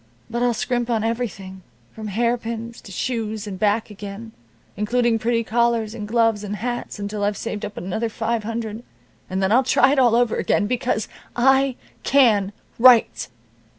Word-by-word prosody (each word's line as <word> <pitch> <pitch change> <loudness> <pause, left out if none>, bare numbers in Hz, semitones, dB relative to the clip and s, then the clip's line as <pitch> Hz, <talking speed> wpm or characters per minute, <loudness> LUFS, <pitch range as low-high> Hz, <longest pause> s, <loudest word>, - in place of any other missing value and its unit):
But 235 +1 -2
I'll 245 -1 +2
scrimp 240 +1 -1
on 225 -2 +1
everything 210 -5 -4 0.3
from 220 -1 -7
hairpins 230 +1 -2
to 195 - -12
shoes, 220 0 -3
and 195 -3 -6
back 210 +1 +1
again, 205 +2 -8 0.4
including 230 +2 +1
pretty 230 +1 +1
collars, 230 -1 +1
and 210 -3 -6
gloves, 225 -2 +2
and 205 0 -4
hats, 240 +3 -4
until 205 0 -4
I've 205 0 0
saved 210 -2 -4
up 210 0 -6
another 220 +6 -2
five 230 0 -1
hundred, 225 0 -4 0.5
and 190 +1 -1
then 190 - +2
I'll 245 +4 +6
try 265 0 +4
it 285 - +2
all 240 -3 +5
over 240 -1 +2
again, - - +1
because 245 -1 -1 0.3
I 265 +1 +3 0.3
can 220 -8 +4 0.3
write." 245 -1 +5
225 Hz, 165 wpm, -22 LUFS, 210-240 Hz, 0.5 s, I'll